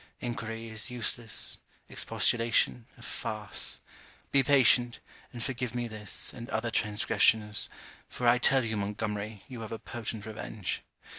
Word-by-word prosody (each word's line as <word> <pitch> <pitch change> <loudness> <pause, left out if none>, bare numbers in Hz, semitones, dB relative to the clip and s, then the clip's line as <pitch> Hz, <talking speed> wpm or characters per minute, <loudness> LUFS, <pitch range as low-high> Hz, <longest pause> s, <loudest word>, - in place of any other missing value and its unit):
Enquiry 115 -2 -4
is 110 +3 -1
useless, 120 -2 0 0.3
expostulation, 115 0 +2
a - - -13
farce. 105 -2 -3 0.5
Be 140 - +6
patient, 125 -3 +5 0.3
and 120 -1 -5
forgive 125 -2 -3
me 120 -1 -1
this, 110 -3 0
and 120 +1 -8
other 115 0 -1
transgressions, 105 0 +3 0.4
for 125 - -1
I 120 +1 +6
tell 130 +1 +4
you, 110 -1 -2
Montgomery, 105 0 -3
you 125 -3 -7
have 110 - -6
a 115 - -3
potent 110 -2 -6
revenge. 110 -3 -4
115 Hz, 135 wpm, -30 LUFS, 110-120 Hz, 0.5 s, Be